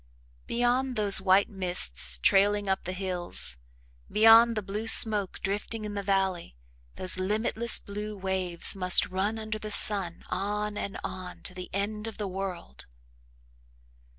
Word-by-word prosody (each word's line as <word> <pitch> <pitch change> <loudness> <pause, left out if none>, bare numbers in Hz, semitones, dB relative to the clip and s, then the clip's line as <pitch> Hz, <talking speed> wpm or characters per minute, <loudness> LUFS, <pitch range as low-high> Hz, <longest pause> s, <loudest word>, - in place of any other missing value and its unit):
Beyond 245 +2 -1
those 205 -3 +5
white 190 +1 +3
mists 175 - +1
trailing 205 - +2
up 190 0 -2
the 185 - -4
hills, 180 - -2 0.5
beyond 225 +1 +5
the 215 - -3
blue 205 +3 -6
smoke 210 -4 +5
drifting 210 +2 -4
in 210 - -6
the 200 - -4
valley, 190 - -2 0.4
those 185 0 +1
limitless 220 +4 -1
blue 210 +1 -8
waves 185 -2 -3
must 185 -2 +2
run 195 +4 -3
under 215 -1 -6
the 215 - -7
sun 195 -4 +4
on 210 +2 -3
and 200 - -6
on 185 -1 -8
to - - -5
the 180 0 -9
end 210 +2 -4
of 225 - -9
the 210 -2 -4
world! 185 - -8
200 Hz, 145 wpm, -27 LUFS, 185-215 Hz, 0.5 s, those